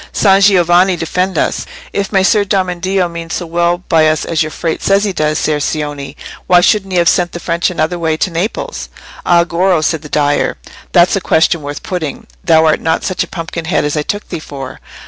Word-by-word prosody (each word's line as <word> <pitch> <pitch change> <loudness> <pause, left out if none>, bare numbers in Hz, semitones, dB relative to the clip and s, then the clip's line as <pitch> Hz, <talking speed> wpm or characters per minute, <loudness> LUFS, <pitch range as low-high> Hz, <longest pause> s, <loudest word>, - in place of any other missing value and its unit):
"San 195 -1 +3
Giovanni 185 -1 +4
defend 180 +3 -2
us! - - -1 0.3
If 200 -1 -2
Messer 200 +1 +3
Domeneddio 185 -1 0
means 170 -1 -6
so 175 - -4
well 170 +1 0
by 160 -2 +4
us 155 0 0
as 165 -2 0
your 155 - 0
Frate 160 +1 -3
says 200 +1 +2
he 200 -2 -1
does, 155 -2 0
Ser 155 -2 0
Cioni, 145 -2 -3 0.3
why 180 - +6
shouldn't 195 +2 +2
he 180 - 0
have 170 -1 +3
sent 175 -1 +2
the 175 - -5
French 170 0 -1
another 175 0 -2
way 160 -2 0
to 185 - -1
Naples?" 205 - -3 0.4
"Ay, 170 -1 +5
Goro," 175 +1 +1
said 155 0 0
the 150 - -11
dyer; 145 -1 +1 0.3
"that's 175 +1 +4
a 195 - -1
question 165 0 +2
worth 145 0 -6
putting. 170 -6 -4 0.2
Thou 160 -2 +4
art 155 - +2
not 160 0 0
such 185 - -1
a - - -9
pumpkin 165 -1 -6
head 160 -3 0
as 145 - -1
I 150 - 0
took 205 +7 -4
thee 170 - -4
for. 135 -4 -8
170 Hz, 210 wpm, -14 LUFS, 155-185 Hz, 0.4 s, why